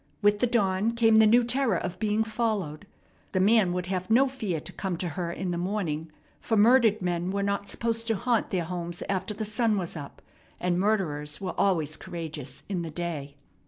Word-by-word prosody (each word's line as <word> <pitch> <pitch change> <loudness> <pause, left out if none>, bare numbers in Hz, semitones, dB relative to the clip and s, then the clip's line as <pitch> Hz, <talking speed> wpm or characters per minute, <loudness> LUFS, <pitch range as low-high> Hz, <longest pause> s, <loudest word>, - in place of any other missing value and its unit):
With 205 0 +4
the 245 - +3
dawn 210 -2 +1
came 225 -1 +5
the 220 0 +7
new 240 +3 +5
terror 240 -4 +1
of 180 +1 -4
being 215 0 +1
followed. 215 -9 -2 0.5
The 185 - +2
man 205 -1 +4
would 180 0 -2
have 185 +1 -3
no 245 +5 +5
fear 220 -11 -3
to - - -8
come 190 -3 -3
to 175 0 -2
her 170 +2 -3
in 180 +1 -3
the 170 - -2
morning, 170 -5 -2 0.3
for 225 - 0
murdered 225 -2 +5
men 175 0 -1
were 200 +1 -1
not 200 0 -1
supposed 230 -1 -1
to 225 - +2
haunt 235 +2 0
their 180 -4 -1
homes 175 0 -4
after 195 +1 -2
the 215 - -3
sun 215 0 +1
was 175 -3 -3
up, 145 -3 -9 0.4
and 180 0 0
murderers 155 -8 0
were 185 -2 -4
always 160 -6 +1
courageous 155 -5 -7
in 190 -3 -2
the 165 - -4
day. 155 -4 -5
190 Hz, 200 wpm, -27 LUFS, 175-220 Hz, 0.5 s, the